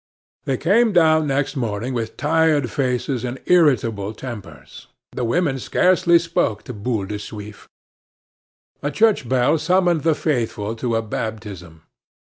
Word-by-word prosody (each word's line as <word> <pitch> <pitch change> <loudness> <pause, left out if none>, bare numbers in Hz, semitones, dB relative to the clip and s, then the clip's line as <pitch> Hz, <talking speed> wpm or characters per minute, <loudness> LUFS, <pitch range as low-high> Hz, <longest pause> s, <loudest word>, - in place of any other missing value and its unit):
They 135 - 0
came 215 - +3
down 160 -3 +4
next 140 +2 -1
morning 120 0 -3
with 115 -2 -4
tired 155 -4 +2
faces 125 -1 -1
and 125 +1 -4
irritable 115 - +2
tempers; 100 - -10 0.2
the 125 - -4
women 135 +2 0
scarcely 175 +4 +3
spoke 165 -11 -1
to 125 - -8
Boule 105 -1 -2
de 105 +1 -5
Suif. 105 0 -10 1.1
A 145 - -1
church 210 - +2
bell 130 +5 +2
summoned 175 0 +2
the 160 0 +2
faithful 115 -8 -2
to 115 0 -1
a 115 - 0
baptism. 100 -7 -6
125 Hz, 135 wpm, -21 LUFS, 110-160 Hz, 1.1 s, down